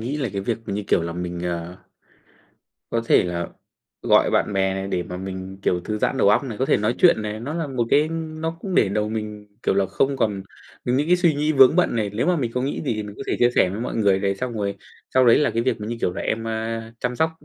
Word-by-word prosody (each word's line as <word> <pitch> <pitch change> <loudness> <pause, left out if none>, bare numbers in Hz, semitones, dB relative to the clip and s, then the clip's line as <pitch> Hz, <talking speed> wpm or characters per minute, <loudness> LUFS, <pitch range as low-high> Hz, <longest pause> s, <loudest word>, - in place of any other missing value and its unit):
nghĩ 125 +6 -3
là 135 -5 -1
cái 100 - -2
việc, 115 +2 -1
như 105 0 -2
kiểu - - +2
là, 85 0 -3
mình, 90 0 -4
ờ, 85 0 -4 1.1
có 115 - 0
thể - - +5
là 85 -1 -3 0.5
gọi - - +4
bạn - - +1
bè 95 -1 +1
này 95 0 -3
để 90 -2 -1
mà 90 +1 -7
mình, 95 0 -6
kiểu, 90 - +1
thư 105 +4 -4
giãn - - 0
đầu - - +4
óc 105 - +4
này, 115 -6 -6
có 130 - +1
thể - - +4
nói 105 +3 0
chuyện 170 -11 +5
này, 105 0 -4
nó 140 +6 -4
là 165 -2 -2
một 130 -4 -1
cái 150 +2 +4
nó 160 0 -4
cũng 190 0 -4
để - - +4
đầu 105 +2 -1
mình, 105 -1 -5
kiểu - - +1
là, 100 0 +2
không 135 +8 0
còn 100 -6 0 0.4
những 130 +5 +1
cái 180 - +4
suy 175 -3 +3
nghĩ 150 +2 +1
vướng 135 +1 +6
bận 180 -9 +2
này. 105 -3 0
Nếu 110 - 0
mà 180 0 +3
mình 125 -7 -1
có 125 - 0
nghĩ 140 - -2
gì 135 -6 -1
thì 105 - -3
mình 105 -1 -8
có - - -6
thể - - 0
chia 120 - +4
sẻ 90 - +4
với 100 +4 -5
mọi 120 - -3
người 100 -4 +3
này, 100 0 0
xong 125 +4 -4
rồi 100 -3 -2 0.4
sau 130 -1 +5
đấy 115 - +7
là 150 - +2
cái 115 - 0
việc 130 -3 -1
mà, 105 - -5
như 120 +2 -3
kiểu 90 - 0
là, - - -5
em, 115 +1 -2
a, 115 0 -4
chăm 125 0 -2
sóc 160 +3 +2
110 Hz, 280 wpm, -23 LUFS, 100-135 Hz, 1.1 s, đấy